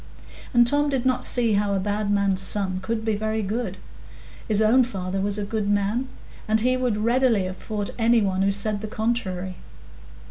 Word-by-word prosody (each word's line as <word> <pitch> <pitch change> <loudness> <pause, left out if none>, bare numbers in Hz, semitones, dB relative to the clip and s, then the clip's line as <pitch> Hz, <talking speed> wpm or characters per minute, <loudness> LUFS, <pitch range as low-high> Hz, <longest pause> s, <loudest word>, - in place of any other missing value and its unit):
And 240 -2 +5
Tom 290 +4 +2
did 265 -3 -1
not 255 -1 +1
see 235 -3 +3
how 200 0 +1
a - - 0
bad 205 +1 -2
man's 200 -2 +2
son 190 -1 +1
could 220 +3 -3
be 220 - +1
very 215 +1 -2
good. 205 -1 -3 0.7
His 210 -2 +3
own 225 +4 +4
father 195 -5 -4
was 205 +1 -1
a 210 - -2
good 205 0 -2
man, 205 +5 0 0.4
and 220 0 +2
he 255 +2 +2
would 250 -4 -1
readily 230 -1 +2
have 185 0 -5
fought 210 -2 -4
any 230 +1 +4
one 190 -1 0
who 195 +1 +2
said 205 +1 0
the 215 - -5
contrary. 190 -5 -3
215 Hz, 190 wpm, -24 LUFS, 200-235 Hz, 0.7 s, And